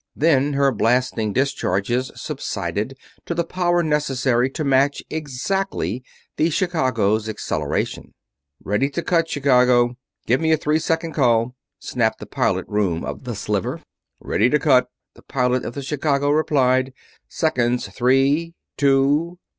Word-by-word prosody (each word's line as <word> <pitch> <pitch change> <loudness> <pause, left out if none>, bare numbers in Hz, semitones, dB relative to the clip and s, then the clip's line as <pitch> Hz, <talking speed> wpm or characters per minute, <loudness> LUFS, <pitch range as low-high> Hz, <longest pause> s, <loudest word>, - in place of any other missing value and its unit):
Then 145 -2 +2
her 140 0 +3
blasting 115 -1 +1
discharges 125 -1 0
subsided 110 +7 -4 0.3
to 170 - -2
the 170 - +1
power 175 0 0
necessary 135 -5 +1
to 155 +4 -4
match 140 0 +2
exactly 145 - -2 0.3
the 160 - +2
Chicago's 125 - 0
acceleration. 100 -3 -3 0.5
"Ready 105 +8 0
to 155 +4 -4
cut, 165 -2 +1
Chicago! 125 -3 +3 0.3
Give 125 +6 +2
me 160 0 +2
a - - +3
three 150 +1 +1
second 165 0 -1
call!" 120 -3 +2 0.2
snapped - - -1
from - - -10
the - - -25
pilot - - 0
room 95 -6 -1
of - - -7
the - - -4
Sliver. - - -2 0.4
"Ready 115 +4 +1
to 150 - +3
cut!" 130 -4 +3 0.3
the - - -18
pilot 125 -1 0
of - - -6
the 140 - -5
Chicago 145 0 0
replied. 130 -4 +2 0.4
"Seconds! 125 -6 0
Three! 135 +7 +1 0.2
Two! 145 +5 +2
135 Hz, 140 wpm, -21 LUFS, 125-155 Hz, 0.5 s, her